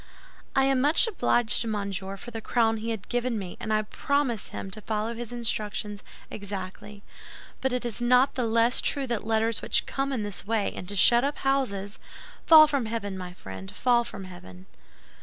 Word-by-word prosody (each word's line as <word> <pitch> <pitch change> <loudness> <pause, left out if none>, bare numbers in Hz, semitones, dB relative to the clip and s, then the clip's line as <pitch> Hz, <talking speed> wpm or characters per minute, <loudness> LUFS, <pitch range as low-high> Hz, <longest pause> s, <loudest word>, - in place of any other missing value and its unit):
"I 270 - +4
am 270 -1 +2
much 295 - +4
obliged 240 - +2
to 230 - -2
Monsieur 195 -2 -3
for 240 - -10
the 225 -1 -6
crown 225 -1 +1
he 220 +1 -5
has 220 -3 -3
given 245 -1 -1
me, 190 -4 -6
and 215 - -4
I 215 0 +2
promise 265 0 -1
him 195 - -7
to 215 - -6
follow 215 +2 -2
his 235 0 -7
instructions 215 -3 -2 0.3
exactly; 200 0 -7 0.6
but 265 - 0
it 250 0 -2
is 240 0 -2
not 250 +2 +4
the 250 -3 -1
less 230 +2 +3
true 280 -1 0
that 235 -4 -3
letters 225 0 0
which - - +2
come 275 0 -2
in 245 -6 -2
this 205 -2 -6
way 215 +1 -1
into 195 +3 -5
shut 235 +6 +7
up 285 +1 -1
houses—" 230 -8 -1 0.5
"Fall 315 -1 +10
from 280 -6 -1
heaven, 215 -3 -4
my 180 -1 -7
friend, 95 - -9
fall 240 -1 +3
from 205 -4 -8
heaven." 95 - -12
225 Hz, 190 wpm, -26 LUFS, 200-245 Hz, 0.6 s, Fall